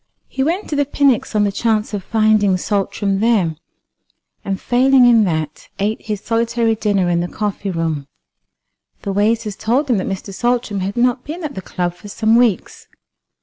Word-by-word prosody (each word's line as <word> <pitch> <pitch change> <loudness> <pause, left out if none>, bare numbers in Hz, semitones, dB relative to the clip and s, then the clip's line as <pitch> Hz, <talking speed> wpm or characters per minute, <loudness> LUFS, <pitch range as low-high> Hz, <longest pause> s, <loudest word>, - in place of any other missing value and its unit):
He 265 - -4
went 340 +9 0
to - - 0
the 285 - +2
Pnyx 275 -6 +1
on 210 - +3
the 200 - +1
chance 215 +1 0
of 200 -2 -3
finding 215 -3 +2
Saltram 195 +1 -1
there, 205 -8 +2 0.9
and 195 -1 -3
failing 255 +1 +4
in 230 -3 +5
that, 155 -4 -3
ate 210 +2 -1
his 210 -2 -3
solitary 230 0 0
dinner 205 -4 0
in 175 -1 +1
the 175 - -1
coffee 205 0 -3
room. 165 -5 -2 1.0
The 200 - -2
waiters 210 +1 0
told 255 +7 0
him 230 - +3
that 185 - -2
Mr. 195 +1 -5
Saltram 240 -2 -1
had 195 +4 -3
not 250 +1 +2
been 330 +4 -7
at 295 -2 -4
the 190 - -6
club 175 -1 -3
for 205 - -13
some 220 +2 +1
weeks. 235 -6 +1
215 Hz, 180 wpm, -18 LUFS, 195-240 Hz, 1.0 s, in